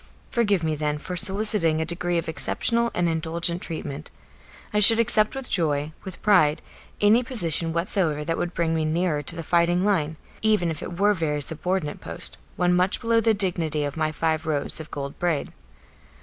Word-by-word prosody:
Forgive 205 -7 +1
me 160 -1 0
then 150 0 -2
for 180 +4 -7
soliciting 190 -4 +3
a 160 - -1
degree 175 +1 -2
of 165 - -3
exceptional 235 +8 0
and 175 -1 +1
indulgent 165 +2 -1
treatment. 150 -2 -6 0.6
I 210 - +2
should 225 +2 +9
accept 220 -1 +5
with 270 -2 -5
joy, 150 -4 -1
with 190 -2 -10
pride, 165 -7 +3 0.4
any 210 +4 +4
position 170 -10 0
whatsoever 165 -3 -1
that 165 +1 -1
would 175 +1 -4
bring 165 -1 0
me 160 -1 0
nearer 155 -1 -1
to 160 +4 -4
the 165 - -6
fighting 175 +2 +1
line, 160 -7 0 0.2
even 210 -6 +1
if 155 - -7
it 175 - -7
were 205 +1 +4
a - - +2
very 155 -5 -2
subordinate 160 +1 -3
post, - - -2 0.2
one 180 0 +1
much 180 +2 +1
below 230 -1 +1
the 225 0 +2
dignity 170 -6 -1
of 145 -1 -4
my 155 -1 -1
five 160 0 -2
rows 145 -1 0
of 155 - -9
gold 140 -1 -7
braid. 170 -5 -2
170 Hz, 190 wpm, -24 LUFS, 155-195 Hz, 0.6 s, should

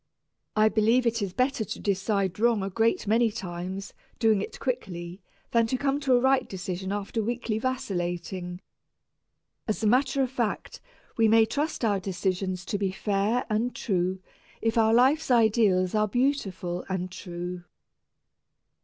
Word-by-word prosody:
I 215 0 +5
believe 225 +3 +3
it 230 -1 +1
is 200 -2 -2
better 255 +2 0
to - - -6
decide 195 -1 0
wrong 230 -3 +3
a 195 - -3
great 225 +4 +1
many 225 +2 +3
times 185 +1 -6 0.2
doing 220 -4 +3
it - - -6
quickly 180 -7 -4 0.3
than 230 -1 +3
to 255 - 0
come 280 +1 0
to 270 -3 +3
a - - +5
right 265 +1 +2
decision 190 0 -4
after 205 +2 -2
weakly 230 -1 -2
vacillating. 180 -6 -3 1.1
As 215 +1 -2
a - - +2
matter 265 +4 +3
of 255 - -2
fact, 235 -5 -3 0.4
we 225 -1 +5
may 225 0 +6
trust 290 +1 -2
our 205 -3 +2
decisions 185 0 -2
to 205 - -2
be 195 -2 0
fair 205 +5 0
and 225 +3 -1
true 185 -3 -1 0.4
if 225 0 0
our 225 -1 +4
life's 260 +7 +4
ideals 215 -6 +3
are 215 0 +2
beautiful 200 -8 -1
and 185 -1 -2
true. 175 0 -6
215 Hz, 155 wpm, -27 LUFS, 185-235 Hz, 1.1 s, may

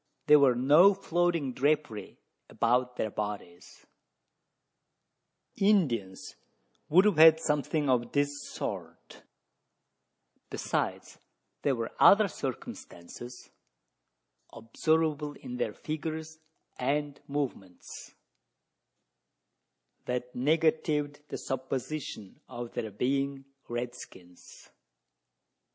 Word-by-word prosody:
There 150 -1 +7
was 135 -3 +5
no 155 +10 +6
floating 170 -7 0
drapery 145 -5 -1 0.3
about 125 +1 +1
their 110 - -2
bodies 105 -5 -7 1.7
Indians 135 - +1 0.5
would 185 +6 +6
have 205 -6 +3
had 160 0 +8
something 150 -1 0
of 125 -2 +1
this 145 0 0
sort; - - -7 1.3
besides - - -3 0.4
there 140 -2 +1
were 115 -1 -4
other 210 +1 +7
circumstances 120 - -8 1.0
observable 150 +5 0
in 125 -3 -8
their 110 - -2
figures 160 +1 -5 0.4
and 145 +2 -1
movements, 130 -11 -6 1.9
that 125 0 -3
negatived 150 +1 +1
the - - -4
supposition 130 -4 -5
of 120 0 -7
their 110 - -3
being 135 +5 -1 0.2
red 120 +1 -3
skins. 90 -7 -14
140 Hz, 85 wpm, -29 LUFS, 120-155 Hz, 1.9 s, had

